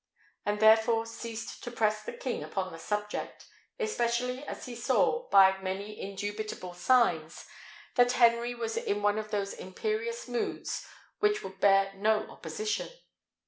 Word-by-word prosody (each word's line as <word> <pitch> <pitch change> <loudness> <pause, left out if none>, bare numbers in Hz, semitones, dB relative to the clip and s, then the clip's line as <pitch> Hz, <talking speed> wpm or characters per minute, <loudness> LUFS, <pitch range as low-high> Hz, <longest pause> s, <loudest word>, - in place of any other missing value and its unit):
He 205 - +2
therefore 220 +1 +5
ceased 230 0 -7
to - - -4
press 215 -2 +1
the - - -6
king 255 -3 -3
upon 185 -1 -3
the 165 - -9
subject, 210 +3 -4 0.3
especially 250 - 0
as - - -6
he 250 - -7
saw, 470 - +1
by 190 -1 +6
many 195 +2 -4
indubitable 205 -1 -5
signs, 175 -5 +2 0.5
that 245 -1 +4
Henry 235 0 +4
was 230 -1 -3
in 205 0 -1
one 205 +1 +3
of 215 0 -6
those 200 -2 -2
imperious 440 - -3
moods 440 -3 -3 0.3
which 420 0 +2
would 190 0 -8
bear 195 0 +4
no 215 +2 +1
opposition. 430 -1 -3
220 Hz, 140 wpm, -30 LUFS, 200-245 Hz, 0.5 s, by